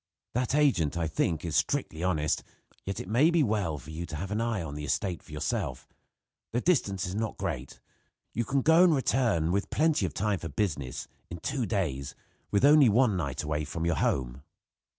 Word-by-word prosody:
That 125 +2 0
agent, 120 - +2
I 85 -1 0
think, 80 +1 -1
is 80 -2 -2
strictly 80 - 0
honest; 75 -5 +1 0.5
yet 95 - -3
it - - -6
may 125 - +4
be 170 -3 +3
well 100 - 0
for 70 +3 -11
you 85 +2 -5
to 80 - -6
have 95 +6 -5
an 105 +2 0
eye 115 -6 -1
on 75 -3 -6
the 75 0 -6
estate 90 +4 -1
for - - -17
yourself. 75 0 -3 0.7
The 120 - +2
distance 100 - +1
is 90 - -4
not 110 +1 -2
great. - - -4 0.5
You 120 - 0
can 135 +3 0
go 160 +3 +6
and 170 -4 +5
return, 115 - +1
with 100 +2 0
plenty 150 -10 +2
of 80 - -8
time 105 -2 0
for 80 - -6
business, 70 - -2 0.2
in 85 - -6
two 120 - -2
days, 75 - -2 0.3
with 100 +6 +3
only 145 -3 +7
one 115 -1 +3
night 70 -6 -2
away 75 0 -1
from 85 +2 -4
your 85 -4 +1
home. 65 -1 -1
95 Hz, 200 wpm, -29 LUFS, 80-120 Hz, 0.7 s, only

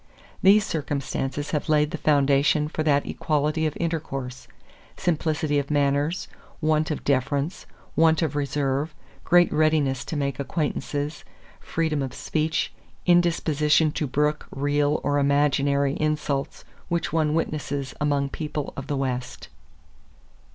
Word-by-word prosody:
These 205 +2 +6
circumstances 145 -1 -3
have 150 -1 -2
laid 150 0 +3
the 165 - -3
foundation 145 0 +3
for 155 - -3
that 145 -2 +2
equality 155 +1 0
of 150 - -5
intercourse, 135 -6 -4 0.5
simplicity 155 -3 0
of 140 - -4
manners, 145 +4 +1 0.3
want 155 0 +1
of 155 - -3
deference, 140 +4 -1 0.3
want 160 0 +4
of 150 -3 -1
reserve, 145 +1 -1 0.3
great 175 0 +4
readiness 150 -5 +2
to - - -4
make 140 -1 -2
acquaintances, 145 0 -2 0.4
freedom 160 -3 -1
of 130 -2 -4
speech, 160 0 -1 0.3
indisposition 160 -3 +3
to 150 - -2
brook 150 +3 0
real 145 +1 +1
or 145 0 +1
imaginary 140 0 +2
insults 150 -2 -2 0.2
which 170 -3 -1
one 155 -2 +2
witnesses 145 -4 -2
among 140 -2 +1
people 150 -1 -4
of 135 0 -6
the 145 -2 -1
West." 125 -2 -3
150 Hz, 125 wpm, -25 LUFS, 140-155 Hz, 0.5 s, These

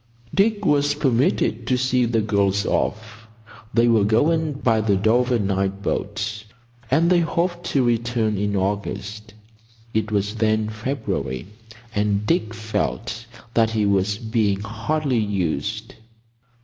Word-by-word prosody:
Dick 205 +1 +2
was 145 -2 +3
permitted 125 -4 +1
to 130 - +2
see 130 -1 +2
the 115 -1 +1
girls 100 -1 +1
off. 110 0 -2 0.4
They 120 0 +3
were 115 -3 +4
going 150 +9 +2
by 115 -5 +1
the 105 -2 +2
Dover 120 +5 +2
night 100 -1 -1
boat; 105 +1 -3 0.5
and 165 +6 +3
they 180 - +5
hoped 175 +1 -1
to 135 - +2
return 120 -2 +1
in 100 +1 -1
August. 100 +2 -3 0.6
It 110 -1 -1
was 105 +1 -1
then 110 -1 +1
February, 110 - -3 0.5
and 105 0 0
Dick 110 -7 0
felt 110 - -3 0.3
that 115 -1 +3
he 110 -2 0
was 100 0 +1
being 110 -3 0
hardly 120 +5 -1
used. 100 +1 -2
110 Hz, 130 wpm, -22 LUFS, 105-125 Hz, 0.6 s, they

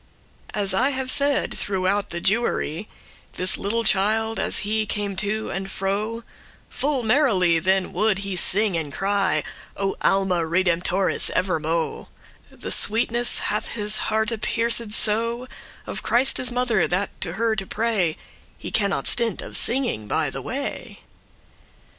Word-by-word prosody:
As 200 -2 +2
I 250 +8 +3
have 265 -2 0
said, 285 -1 +2
throughout 195 +1 -1
the 170 - -5
Jewery, 205 -3 -1 0.4
This 185 +1 +3
little 230 +4 -2
child, 220 +2 +3
as - - +2
he 215 +1 -1
came 205 -2 -2
to 215 +2 -2
and 195 0 -5
fro, 210 +5 -3 0.5
Full 275 -3 -1
merrily 215 - +2
then 190 +2 0
would 210 +2 +1
he 195 -1 -4
sing 200 +2 +4
and 155 -3 -3
cry, 200 +6 0 0.3
O 195 -1 -1
Alma 190 -3 +1
redemptoris, 175 +2 0
evermo'; 165 -3 -1 0.4
The - - -6
sweetness 235 +2 +3 0.2
hath 210 - -3
his 210 -1 +2
hearte 220 0 0
pierced 230 -2 0
so 230 +4 0 0.4
Of - - -5
Christe's 250 0 +1
mother, 245 -5 +1
that 190 +3 -2
to 170 -3 -3
her 225 +3 0
to 195 -3 -4
pray 210 -8 -1 0.4
He - - -8
cannot 200 -2 +1
stint* 235 -2 +1
of - - -7
singing 235 - 0
by - - -1
the - - -6
way. - - -6
205 Hz, 140 wpm, -23 LUFS, 190-230 Hz, 0.5 s, sing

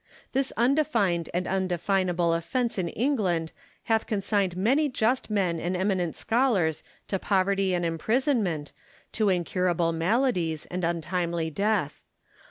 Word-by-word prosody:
This 270 0 0
undefined 235 - +2
and 180 +1 -1
undefinable 180 -2 0
offence 230 +7 -1
in 175 -2 -1
England 190 - 0 0.3
hath 225 -1 +1
consigned 200 -3 0
many 270 +10 +2
just 250 0 0
men 185 -6 0
and 180 +2 -2
eminent 185 -3 0
scholars 220 - +1 0.2
to 195 - -1
poverty 195 -1 +1
and 175 -1 -1
imprisonment, 185 - 0 0.4
to 215 -2 +1
incurable 175 -1 +1
maladies, 170 - 0
and 180 0 -3
untimely 170 0 -1
death. 200 -4 0
185 Hz, 120 wpm, -27 LUFS, 170-220 Hz, 0.4 s, undefined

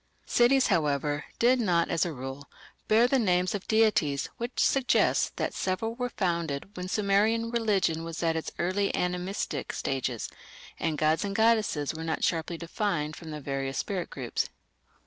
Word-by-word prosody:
Cities, 255 +2 +4
however, 150 -4 +1
did 250 +2 +4
not, 175 -7 +2
as 165 +1 +2
a - - -3
rule, 135 0 -7 0.4
bear 225 +3 +5
the 270 +1 +2
names 180 -4 +2
of 200 -2 -5
deities, 210 -11 +2
which 240 +2 -4
suggests 270 -2 +3
that - - -2
several 190 +5 -1
were 245 +1 -3
founded 170 -3 -2
when 180 0 -5
Sumerian 215 +4 +2
religion 200 -8 +1
was 165 0 -5
in 165 -1 +2
its 160 - -2
early 190 +3 0
animistic 180 +2 -2
stages, 130 -4 -2 0.5
and 160 -2 -1
gods 155 +1 +2
and 200 -1 -3
goddesses 220 -10 +2
were 160 +1 -6
not 165 0 -2
sharply 165 0 0
defined 170 -3 -2
from 165 - -10
the 150 -1 -5
various 135 -1 -3
spirit 185 -4 -2
groups. 130 -3 -3
180 Hz, 160 wpm, -28 LUFS, 155-215 Hz, 0.5 s, bear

